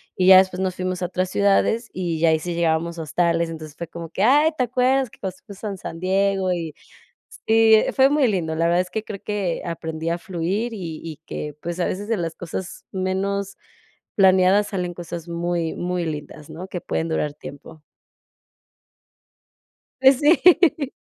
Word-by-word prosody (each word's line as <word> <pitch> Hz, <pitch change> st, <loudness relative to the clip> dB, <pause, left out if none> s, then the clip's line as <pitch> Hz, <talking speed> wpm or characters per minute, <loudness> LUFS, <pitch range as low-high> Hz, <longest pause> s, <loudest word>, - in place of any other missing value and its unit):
y 185 Hz, 0 st, +1 dB
ya 190 Hz, -, +10 dB
después 185 Hz, -1 st, +3 dB
nos 185 Hz, -1 st, -1 dB
fuimos 185 Hz, 0 st, -3 dB
a 180 Hz, -, 0 dB
otras 185 Hz, +1 st, -2 dB
ciudades, 205 Hz, +3 st, +2 dB
y 175 Hz, -3 st, -3 dB
ya, 165 Hz, 0 st, +4 dB
ahí 160 Hz, -, +3 dB
sí 175 Hz, +2 st, -4 dB
llegábamos 170 Hz, 0 st, 0 dB
a -, -, -3 dB
hostales, 170 Hz, +1 st, 0 dB
entonces, 155 Hz, -2 st, -8 dB
fue 170 Hz, -, -6 dB
como 165 Hz, 0 st, -8 dB
que: 190 Hz, -, -4 dB
"¡Ay!, 290 Hz, +8 st, +5 dB
¿te 255 Hz, -, +1 dB
acuerdas 255 Hz, +1 st, +1 dB
que -, -, -19 dB
cuando 190 Hz, -2 st, -4 dB
fuimos 200 Hz, +1 st, -12 dB
a 200 Hz, -2 st, -4 dB
San 165 Hz, -1 st, -7 dB
Diego 190 Hz, 0 st, +1 dB
y?". 165 Hz, -3 st, -5 dB, 0.5 s
Sí, 225 Hz, 0 st, +4 dB
eh, 215 Hz, -, +2 dB
fue 265 Hz, +1 st, +5 dB
muy 290 Hz, -3 st, +3 dB
lindo, 170 Hz, -6 st, -1 dB
la 165 Hz, +1 st, +1 dB
verdad 175 Hz, +1 st, +3 dB
es 185 Hz, -, -7 dB
que 220 Hz, +2 st, -3 dB
creo 200 Hz, -3 st, -8 dB
que 200 Hz, -5 st, -2 dB
aprendí 160 Hz, -1 st, -4 dB
a 170 Hz, -, 0 dB
fluir, 195 Hz, +5 st, -3 dB
y 170 Hz, -6 st, -6 dB
y 160 Hz, -3 st, -7 dB
que, 150 Hz, -1 st, -5 dB
pues, 170 Hz, +1 st, -5 dB
a 175 Hz, -, +1 dB
veces 205 Hz, +2 st, -3 dB
de 225 Hz, -2 st, 0 dB
las 165 Hz, -2 st, -3 dB
cosas 175 Hz, +1 st, -7 dB
menos 195 Hz, +1 st, -2 dB, 0.6 s
planeadas 190 Hz, +1 st, +4 dB
salen 180 Hz, -3 st, -3 dB
cosas 170 Hz, -1 st, -7 dB
muy, 170 Hz, -1 st, -2 dB
muy 180 Hz, 0 st, -2 dB
lindas, 150 Hz, -1 st, -7 dB
¿no?, 165 Hz, +4 st, -8 dB
que 180 Hz, -2 st, -6 dB
pueden 165 Hz, 0 st, -2 dB
durar 150 Hz, -2 st, -1 dB
tiempo. 150 Hz, +2 st, -11 dB, 2.2 s
Pues, 265 Hz, 0 st, +6 dB
sí. 320 Hz, -2 st, +4 dB
185 Hz, 190 wpm, -22 LUFS, 165-200 Hz, 2.2 s, ya